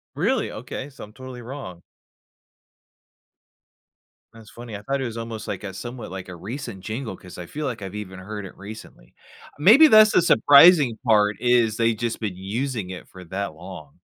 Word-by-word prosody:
Really? - - 0
Okay, 135 - -7
so 140 - -12
I'm 105 - -12
totally 130 0 -10
wrong. 115 -9 -9 2.5
That's 110 -1 -15
funny. 120 -2 -10
I 100 - -7
thought 135 +6 -2
it - - -2
was 115 -1 -6
almost 115 -2 -6
like - - -5
a 95 -2 -6
somewhat 120 +3 -7
like 95 0 -8
a 90 - -8
recent 110 - -7
jingle 110 +1 -5
'cause 90 0 -13
I 90 - -7
feel 150 - -5
like 115 -5 -5
I've 95 -1 -7
even 100 -3 -7
heard 105 +2 -7
it - - -15
recently. 100 - -12 0.5
Maybe 230 - +8
that's 215 -5 +7
the - - +4
surprising 145 -5 +6
part 105 -2 +3
is 120 -3 +2
they 115 0 +2
just 115 +1 -3
been 105 -5 -4
using 110 +2 -4
it 95 -1 -9
for 95 - -13
that 95 +1 -4
long. 80 -3 -12
110 Hz, 185 wpm, -23 LUFS, 95-130 Hz, 2.5 s, Maybe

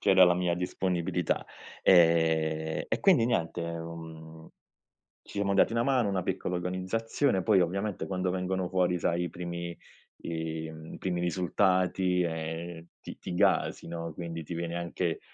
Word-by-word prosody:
c'era 95 -1 +7
la 90 0 +4
mia 90 -1 +1
disponibilità. 90 -1 -1 0.4
Ehm 80 -2 +3
e - - -1
quindi 175 - +5
niente, 85 -7 0
uhm, 80 -1 -7 0.8
ci 100 - -3
mo 100 0 +1
dati 100 - +4
una 115 0 +2
mano, 130 -6 +2
una 95 -2 0
piccola 90 0 -2
organizzazione, 95 +5 0
poi 100 -2 +4
ovviamente 95 +3 -1
quando 90 -1 -1
vengono 90 0 -1
fuori 90 -1 +1
sai 85 +1 0
i - - -2
primi 85 0 -5 0.5
i 80 -1 -4
mhmm, 80 0 -9
primi 90 -2 -2
risultati 90 0 +1
e 80 0 -4
ti - - -9
ti 90 - -6
gasi, 85 - +2
no, 85 -1 -5
quindi 85 -2 -5
ti 85 - -6
viene 85 0 -3
anche 85 0 -2
90 Hz, 150 wpm, -29 LUFS, 85-95 Hz, 0.8 s, c'era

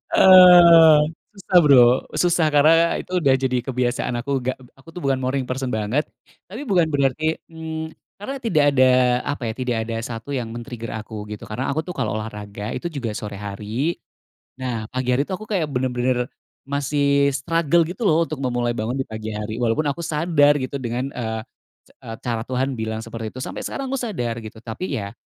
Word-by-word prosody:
Eee, 175 -4 +8 0.3
susah 195 -2 +1
Bro, 140 -4 +7 0.3
susah 170 -2 +2
karena, 150 +3 +6 0.3
itu - - -17
udah 140 -4 +4
jadi 130 -1 0
kebiasaan 125 -1 -1
aku, 140 +4 -5
enggak, 130 +1 -2 0.2
aku 135 +4 -22
tuh 180 - -7
bukan 135 -1 +1
morning 130 0 -1
person 130 0 -2
banget, 110 +8 0 0.4
tapi 215 +8 -7
bukan 175 -5 +3
berarti 145 +2 0
mmm, 160 -1 -6 0.3
karena 235 +7 -5
tidak 175 - +2
ada 130 -1 +5 0.3
apa 145 -3 -3
ya, - - -7
tidak 125 -2 -1
ada 115 - -3
1 115 +3 -7
yang 120 -3 -3
men-trigger 115 -1 -7
aku 105 -1 -7
gitu, 105 - -7
karena 105 - -3
aku 155 +3 -1
tuh 180 - -6
kalo - - -2
olahraga, 105 0 -6
itu 175 - -4
juga 130 -7 -4
sore 105 -1 -6
hari. 105 +10 -3 0.6
Nah, 120 -4 -3
pagi 130 0 -3
hari 135 - +2
itu - - -6
aku 215 +4 -8
kayak 185 -7 0
benar-benar 125 -1 0 0.4
masih 140 0 +1
struggle 165 +3 +2
gitu 180 +7 -7
loh 165 +1 +3
untuk 155 -4 -6
memulai 120 -2 -1
bangun 115 +4 -2
di 135 - -1
pagi 110 0 -6
hari. 105 +1 -4
Walaupun 120 +6 +1
aku 160 - -5
sadar 150 -2 +3
gitu 130 +2 -4
dengan 125 +2 -3
eee, 110 -2 -4 0.4
ca 115 - -11
cara 115 -2 -2
Tuhan 130 +1 -1
bilang 110 0 -3
seperti 115 -1 -6
itu 130 - -8
sampai - - -6
sekarang 275 - -4
aku 270 - -1
sadar 120 - -3
gitu 110 0 -10
tapi 135 +7 -4
ya, 100 -1 -6
130 Hz, 185 wpm, -22 LUFS, 115-160 Hz, 0.6 s, Eee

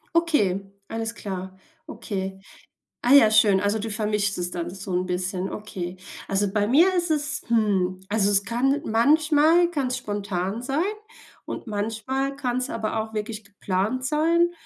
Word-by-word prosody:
Okay, 295 - +2 0.3
alles 225 0 -3
klar. 190 -2 -6 0.3
Okay. 190 -1 -5 0.6
Ah 245 - +1
ja, 240 -7 +8
schön. 210 -3 +5
Also, 205 +2 0
du 225 +2 -4
vermischst 210 -2 0
es 175 0 -2
dann 175 -1 -4
so 190 +1 -6
'n 180 +1 0
bisschen. 185 +1 -2
Okay. 185 -4 -6 0.3
Also 195 0 0
bei 205 0 +1
mir 330 - +5
ist 350 -1 0
es, 300 -1 -1
hm 200 -5 +1
also, 205 -1 +2
es 200 -1 +3
kann 270 +6 +1
manchmal 305 +8 +4
kann 285 -6 -1
es 250 0 -1
spontan 200 -2 -3
sein 275 +6 0 0.6
und - - -6
manchmal 225 +6 -2
kann 250 -3 -2
es 255 - -2
aber 220 0 -2
auch 220 0 -8
wirklich 215 0 -4
geplant 200 +5 -2
sein. 335 +5 +2
215 Hz, 160 wpm, -24 LUFS, 195-270 Hz, 0.6 s, ja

